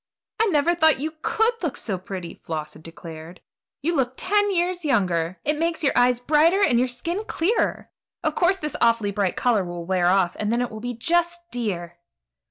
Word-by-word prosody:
"I 450 - +4
never 330 -2 +3
thought 315 -4 +4
you 310 +3 -3
could 445 +2 +2
look 330 -7 -2
so 195 -5 -3
pretty," 185 -2 -7
Floss 155 -2 -6
had - - -14
declared; 165 +1 -10 0.4
"you 340 +3 +1
look 260 -3 0
ten 410 +2 +2
years 355 -1 0
younger. 185 - 0
It 300 +1 0
makes 335 0 0
your 275 - +2
eyes 245 0 +4
brighter 315 +9 +3
and 240 -10 +4
your 255 - +2
skin 335 - -3
clearer. 385 +8 0 0.3
Of 310 -2 +1
course 360 +4 +2
this 300 -5 -5
awfully 230 -3 +3
bright 200 -2 0
color 230 -6 +2
will 175 -1 -6
wear 180 -1 +1
off, 180 -1 +2
and 210 0 -1
then 235 - +1
it 245 - -4
will 220 - -7
be 245 +1 -4
just 345 +7 0
dear." 175 -8 -3
245 Hz, 195 wpm, -24 LUFS, -, 0.4 s, I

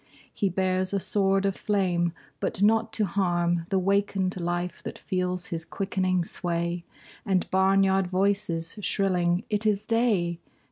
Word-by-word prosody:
He 200 - 0
bears 185 +1 0
a 200 - +2
sword 195 0 +1
of 195 -1 +1
flame 180 -4 +1 0.3
but 195 - -1
not 225 +2 +3
to 215 - +1
harm 175 -2 0
The 195 - +2
wakened 195 0 +1
life 175 +1 -2
that - - -6
feels 180 -1 -2
his 165 -1 -4
quickening 185 0 -1
sway 170 0 -2 0.4
And 190 -2 +1
barnyard 190 0 +3
voices 190 -1 -1
shrilling 180 -2 +1
"It 210 +1 +1
is 205 -1 +1
day!" 210 -8 +1
190 Hz, 140 wpm, -27 LUFS, 175-200 Hz, 0.4 s, not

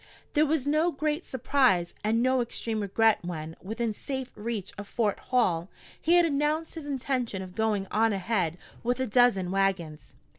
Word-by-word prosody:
There 300 0 +4
was 300 -3 0
no 310 +4 +2
great 305 +3 -2
surprise 255 -9 +2
and 225 +3 +2
no 255 0 +3
extreme 230 -2 -3
regret 215 +2 +3
when, 160 -2 -5
within 225 +3 -2
safe 265 +2 -5
reach 210 -2 -4
of 205 0 -8
Fort 215 -3 0
Hall, 190 -9 +1 0.3
he 335 +2 +4
had 350 -1 +6
announced 305 +1 0
his 320 -3 -7
intention 255 -7 -2
of 185 -1 -10
going 215 -2 0
on 225 +1 +3
ahead 190 -4 0 0.2
with 245 +1 0
a 260 - +1
dozen 215 -6 +3
wagons. 190 -6 -1
230 Hz, 165 wpm, -28 LUFS, 195-270 Hz, 0.3 s, had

